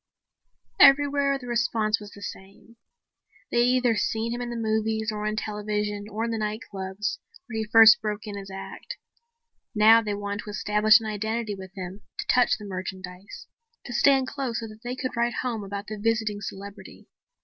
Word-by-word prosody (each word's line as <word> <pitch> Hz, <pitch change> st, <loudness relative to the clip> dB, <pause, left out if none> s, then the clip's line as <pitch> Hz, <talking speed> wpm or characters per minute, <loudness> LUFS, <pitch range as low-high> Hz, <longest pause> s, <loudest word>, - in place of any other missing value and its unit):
Everywhere 280 Hz, 0 st, +5 dB
the 260 Hz, -, -11 dB
response 230 Hz, -2 st, 0 dB
was 205 Hz, -1 st, -10 dB
the 200 Hz, 0 st, -12 dB
same. 195 Hz, +5 st, -10 dB, 0.7 s
They 240 Hz, -, +2 dB
had 255 Hz, -, +3 dB
either 245 Hz, -2 st, +2 dB
seen 225 Hz, +2 st, -1 dB
him 240 Hz, -, -4 dB
in 240 Hz, -, -4 dB
the 240 Hz, -, -5 dB
movies 220 Hz, 0 st, 0 dB
or 210 Hz, 0 st, -3 dB
on 215 Hz, -, -1 dB
television 210 Hz, -1 st, -3 dB
or 220 Hz, +2 st, -2 dB
in 230 Hz, -, -2 dB
the 225 Hz, -, -2 dB
nightclubs, 210 Hz, -2 st, -4 dB, 0.3 s
where 225 Hz, -4 st, -5 dB
he 220 Hz, -, -3 dB
first 225 Hz, 0 st, +8 dB
broke 210 Hz, 0 st, -3 dB
in 205 Hz, -1 st, -6 dB
his 195 Hz, -1 st, -7 dB
act. 190 Hz, 0 st, -8 dB, 0.8 s
Now 220 Hz, +2 st, +7 dB
they 210 Hz, -2 st, -3 dB
wanted 205 Hz, 0 st, -4 dB
to -, -, -8 dB
establish 210 Hz, +2 st, +4 dB
an 225 Hz, -, -8 dB
identity 215 Hz, +1 st, -2 dB
with 190 Hz, 0 st, -10 dB
him, 185 Hz, +1 st, -7 dB, 0.2 s
to -, -, -4 dB
touch 250 Hz, -1 st, +3 dB
the 210 Hz, -, -10 dB
merchandise, 185 Hz, 0 st, -7 dB, 0.4 s
to 240 Hz, -, -6 dB
stand 270 Hz, +1 st, +4 dB
close 260 Hz, -4 st, -3 dB
so 225 Hz, -, -6 dB
that 215 Hz, +1 st, -14 dB
they 245 Hz, +1 st, -4 dB
could 255 Hz, 0 st, -3 dB
write 235 Hz, 0 st, 0 dB
home 235 Hz, -4 st, -2 dB
about 200 Hz, +1 st, -6 dB
the 215 Hz, 0 st, -6 dB
visiting 215 Hz, -1 st, 0 dB
celebrity. 200 Hz, +1 st, -9 dB
215 Hz, 185 wpm, -26 LUFS, 205-230 Hz, 0.8 s, first